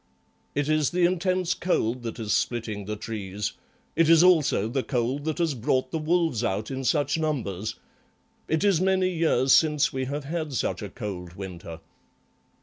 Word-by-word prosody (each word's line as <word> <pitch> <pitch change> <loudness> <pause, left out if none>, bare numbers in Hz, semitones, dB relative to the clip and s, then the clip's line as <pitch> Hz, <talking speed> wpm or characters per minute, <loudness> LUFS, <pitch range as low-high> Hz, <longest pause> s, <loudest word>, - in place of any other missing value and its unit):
"It 145 0 0
is 155 -2 +2
the 175 0 +2
intense 185 0 +1
cold 125 -9 0
that 115 -1 -5
is 105 -2 -1
splitting 110 -4 -1
the 105 +1 -3
trees. 105 -2 -4 0.4
It 165 -1 +3
is 165 0 +7
also 160 - +4
the 130 +4 -1
cold 130 +2 -2
that 160 -2 -1
has 165 -3 +1
brought 130 +2 0
the 160 - -1
wolves 160 -6 +1
out 105 +2 -2
in 135 0 -4
such 145 +4 +1
numbers. 110 - -2 0.7
It 160 +3 0
is 195 -5 +3
many 190 -1 +2
years 155 -6 +3
since 150 -3 +3
we 130 0 -2
have 145 +2 -4
had 155 0 -4
such 125 - -1
a 105 - -5
cold 95 -7 -6
winter." 85 -4 -8
135 Hz, 170 wpm, -26 LUFS, 110-160 Hz, 0.7 s, is